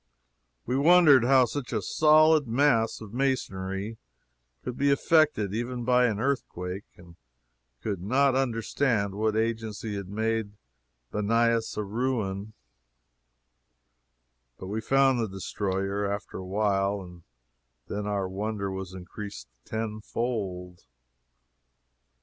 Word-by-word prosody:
We 125 - -1
wondered 150 -3 +6
how 130 0 +6
such 135 +1 -5
a 110 - 0
solid 155 - +4
mass 115 -3 +2
of 110 -1 -10
masonry 105 -5 -2 0.6
could 125 - -4
be 140 +2 +2
affected 140 - +3
even 120 +2 -3
by 125 0 +4
an 105 -3 -2
earthquake, 100 -8 -3
and 85 -1 -16 0.7
could 100 -5 -3
not 130 +7 +3
understand 115 -4 0
what 110 +1 0
agency 110 -1 -2
had 100 -2 -6
made 110 0 -1 0.6
Banias 115 +2 +1
a 105 - 0
ruin; 110 -2 -2 2.0
but - - -8
we 110 +2 -2
found 135 +2 +3
the 115 - 0
destroyer, 95 +1 -2
after 100 0 -5
a 95 - -7
while, 100 0 +1
and 90 -2 -12 0.6
then 105 0 -4
our 100 -2 -1
wonder 100 +1 -3
was 95 -1 -6
increased 95 - -8 0.2
tenfold. 110 -4 -4
110 Hz, 115 wpm, -27 LUFS, 100-125 Hz, 2.0 s, wondered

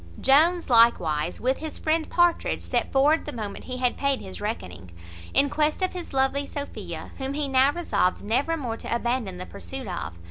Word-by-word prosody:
Jones 330 +6 +4
likewise, 180 - +3
with 260 +2 0
his 315 -1 -6
friend 315 0 0
Partridge, 345 -1 +2
set - - -1
forward 290 +4 +3
the 295 - -4
moment 215 -6 -6
he 255 - -5
had 250 -1 0
paid 280 -1 +1
his 190 +1 -9
reckoning, 90 - -5 0.4
in 285 - +4
quest 305 +5 0
of 370 - 0
his 360 -2 -6
lovely 270 +1 +1
Sophia, 285 0 -6
whom 265 +1 -3
he 295 -1 -1
now 270 +1 +4
resolved 210 - 0
never 270 +10 0
more 240 -6 -4
to 235 - -3
abandon 235 -6 -2
the 180 - -6
pursuit 270 +6 -8
of. 175 - -5
265 Hz, 185 wpm, -25 LUFS, 225-300 Hz, 0.4 s, Jones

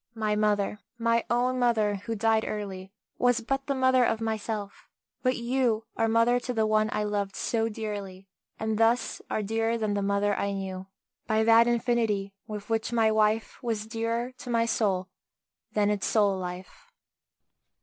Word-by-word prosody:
My 215 -1 0
mother 210 -1 +1 0.2
my 230 0 +2
own 250 +1 +1
mother, 220 -4 +2
who 230 - -2
died 220 +1 +2
early, 195 -3 -5 0.3
Was 245 -1 +3
but 270 +4 -2
the 280 - 0
mother 260 -1 +4
of 225 -2 +1
myself; 220 -2 -4 0.3
but 255 0 +1
you 235 -2 0
Are 225 - +1
mother 230 +2 +3
to 250 0 -4
the 220 -1 +2
one 215 0 +2
I 210 - -1
loved 205 -2 -2
so 225 -1 0
dearly, 205 -3 -6 0.3
And 220 0 -2
thus 230 +2 +2
are 215 - -1
dearer 225 +2 0
than 215 -2 -1
the 200 - 0
mother 200 +1 +1
I 200 +1 -1
knew 190 -1 -5 0.4
By 220 0 +2
that 230 +1 +6
infinity 230 -5 0
with 210 -1 -6
which 225 0 -1
my 225 -2 +3
wife 215 +1 +1
Was 225 -4 -2
dearer 230 +2 -2
to 250 - -8
my 230 -1 +2
soul 195 -5 0 0.7
than 210 -1 +2
its 205 -2 -1
soul 205 -3 +3
life. 180 0 -7
220 Hz, 170 wpm, -27 LUFS, 205-230 Hz, 0.7 s, that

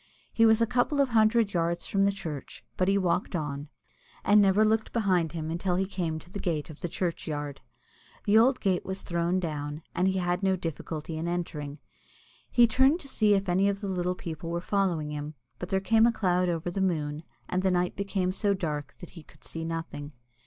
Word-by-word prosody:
He 225 0 +5
was 220 +1 +5
a - - +4
couple 250 +4 +1
of 275 -2 +3
hundred 220 -1 +3
yards 170 0 0
from 195 0 +2
the 200 - +3
church, 165 -8 -7
but 185 - +1
he 195 +1 +3
walked 180 0 0
on, 145 -2 -3 0.6
and 205 +1 +6
never 200 +2 +4
looked 220 0 +1
behind 185 -8 +1
him 160 -1 -4
until 175 +2 0
he 190 +2 +1
came 175 -5 -2
to 175 +3 -12
the 200 - -5
gate 160 -4 -2
of 155 - -13
the 175 - -3
churchyard. 150 -5 -3 0.6
The 205 - +2
old 250 +4 +5
gate 185 -3 +1
was 190 0 -4
thrown 170 +1 0
down, 150 -2 -4
and 185 - +1
he 190 0 +1
had 180 0 0
no 190 -1 +2
difficulty 160 -1 -5
in 165 - -3
entering. 150 -4 -3 0.7
He 240 - +6
turned 265 +5 +4
then - - -1
to 310 - -10
see 210 -5 +3
if 195 0 -1
any 190 +3 +3
of 200 0 -2
the 200 - -3
little 180 -1 -1
people 165 -1 -6
were 170 0 -1
following 175 -5 0
him, 150 +1 -5 0.2
but 180 - -5
there 190 -1 +2
came 220 +4 +4
a - - +4
cloud 180 -5 +1
over 170 0 -2
the 195 - -2
moon, 155 -5 -1 0.3
and 185 - 0
the 190 - +2
night 180 -1 +1
became 195 -2 -1
so 200 +1 +1
dark 150 -7 -4
that 175 - -9
he 170 - -11
could 150 0 -21
see 165 - -5
nothing. 165 -3 -5
180 Hz, 215 wpm, -28 LUFS, 165-200 Hz, 0.7 s, and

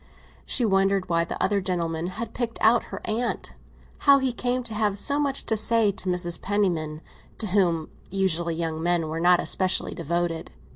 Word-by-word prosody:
She 245 - +3
wondered 195 -2 +2
why 170 -1 +2
the - - -6
other 205 -1 +1
gentleman 170 -3 -2
had 220 +6 -6
picked 235 -2 -3
out 230 +1 +4
her - - -8
aunt—how 245 +4 0
he 265 -2 0
came 250 +1 -1
to 230 -2 -8
have 210 -2 0
so 285 +7 +2
much 280 -2 -1
to 220 - +1
say 220 -1 +3
to 190 -1 -5
Mrs. 175 -1 +1
Penniman, 170 -6 -1 0.4
to 225 - -4
whom, 175 -5 +1 0.2
usually, 175 -3 0
young 160 -1 -3
men 170 -2 0
were 160 +1 -3
not 175 +1 +5
especially 185 -1 0
devoted. 170 +1 -2
190 Hz, 175 wpm, -25 LUFS, 170-225 Hz, 0.4 s, not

